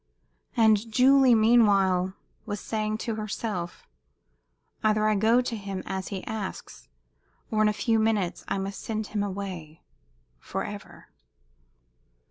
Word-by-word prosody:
And 220 -1 +3
Julie, 260 +1 +6
meanwhile, 200 -5 +4 0.3
was 205 - -3
saying 215 -1 -2
to 225 -3 -2
herself, 205 -4 -4 1.0
"Either 215 0 +3
I 215 - +3
go 220 +4 +3
to 245 -2 -3
him, 195 -3 -5
as 190 0 -4
he 195 -2 -5
asks, 210 - -6 0.6
or 215 -1 +2
in 215 - +5
a - - +2
few 220 +2 +1
minutes 215 -5 0
I - - -1
must 195 +1 -4
send 220 -1 -3
him 210 - 0
away 185 -6 -6 0.6
forever." - - -7
215 Hz, 125 wpm, -27 LUFS, 195-220 Hz, 1.0 s, Julie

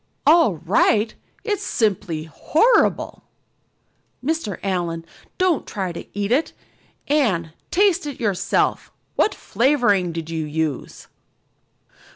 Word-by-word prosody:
"All 310 - +5
right! 205 +6 +2 0.3
It's 415 -4 -1
simply 195 -7 -1
horrible. 315 - +2 1.0
Mr. 310 - -1
Allan, 175 -4 -2 0.3
don't 370 -5 +1
try 190 -3 -3
to 170 - -8
eat 205 +1 -1
it. 285 +6 +1 0.5
Anne, 195 - +1 0.2
taste 375 -4 +2
it 285 - -6
yourself. 205 -6 0 0.2
What 425 - +2
flavoring 220 -7 +2
did 165 -1 -5
you 160 -1 -2
use?" 155 -2 -3
205 Hz, 105 wpm, -22 LUFS, -, 1.0 s, All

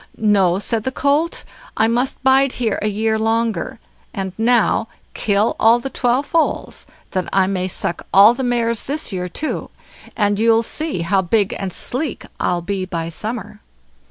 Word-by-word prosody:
"No", 195 -5 +3
said 220 +3 -1
the 260 - -3
colt, 290 +5 0 0.3
"I 220 - +4
must 245 +4 -1
bide 265 0 +4
here 225 -5 -1
a 210 - 0
year 220 +1 0
longer; 225 -4 -1 0.4
and 190 -2 -3
now 230 0 +2 0.3
kill 205 +1 +1
all 225 +2 +6
the 265 +3 -6
twelve 250 +3 +1
foals, 330 0 -1 0.2
that 185 -2 -2
I 190 -1 +3
may 185 -1 -1
suck 175 -1 -2
all 200 +5 +8
the 255 - -5
mares 235 -2 +1
this 290 -5 -2
year 180 -1 -3
too, 305 - -3 0.5
and 205 -2 +1
you'll 225 0 +4
see 305 - -3
how 190 +3 +2
big 200 +2 +1
and 195 -1 -3
sleek 260 - -3
I'll 175 -1 0
be 195 +1 -2
by 165 -3 -4
summer." 220 +7 -6
220 Hz, 165 wpm, -19 LUFS, 195-245 Hz, 0.5 s, all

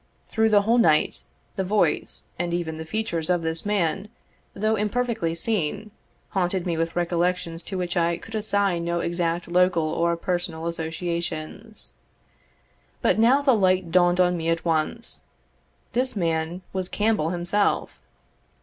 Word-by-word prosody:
Through 220 0 +2
the 205 -1 +5
whole 230 +3 +3
night, 155 -8 +3 0.3
the 190 - +1
voice, 205 +3 0 0.2
and 175 0 -1
even 160 -2 -3
the 160 - -6
features 170 -3 -2
of 175 -2 +2
this 160 +4 -2
man, 200 0 0 0.5
though 215 +2 +1
imperfectly 215 -5 -1
seen, 210 +2 -1 0.4
haunted 185 -1 0
me 175 -2 0
with 165 0 -2
recollections 175 -1 0
to 190 - -4
which 180 -1 -2
I 170 -1 +2
could 225 - -12
assign 200 -5 +1
no 170 0 -1
exact 170 0 -1
local 180 -1 +3
or 170 +2 0
personal 175 -2 -2
associations. 170 +4 -4 1.1
But - - +3
now 255 +5 +5
the 270 -2 +5
light 185 -4 +2
dawned 175 0 +4
on 180 -1 +4
me 165 -1 -2
at 165 0 0
once; 165 +8 -1 0.7
this 255 0 +1
man 165 0 -1
was 185 -1 -3
Campbell 210 -7 +1
himself. 175 +4 0
175 Hz, 145 wpm, -25 LUFS, 165-205 Hz, 1.1 s, the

